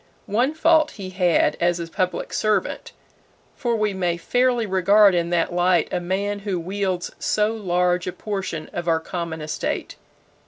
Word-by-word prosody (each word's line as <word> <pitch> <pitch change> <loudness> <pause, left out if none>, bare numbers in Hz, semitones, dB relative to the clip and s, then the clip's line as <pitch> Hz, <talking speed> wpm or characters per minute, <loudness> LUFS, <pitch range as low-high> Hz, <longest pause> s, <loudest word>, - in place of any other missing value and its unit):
One 245 +9 0
fault 320 -1 +4
he 190 -2 -6
had 175 -5 +2
as 175 0 +2
a 170 - -3
public 180 +2 -3
servant 215 -1 -1 0.6
for 240 -3 -1
we 215 -2 0
may 175 -2 -1
fairly 245 +6 +1
regard 200 +1 +5
in 170 -1 0
that 175 0 0
light 175 0 +2
a - - +1
man 200 +3 -2
who 200 -3 -3
wields 185 0 -2
so 215 +1 +1
large 180 -4 0
a - - -1
portion 190 -6 -4
of 175 0 -4
our 165 -1 +3
common 165 -1 -5
estate. 155 0 -4
185 Hz, 160 wpm, -23 LUFS, 175-210 Hz, 0.6 s, regard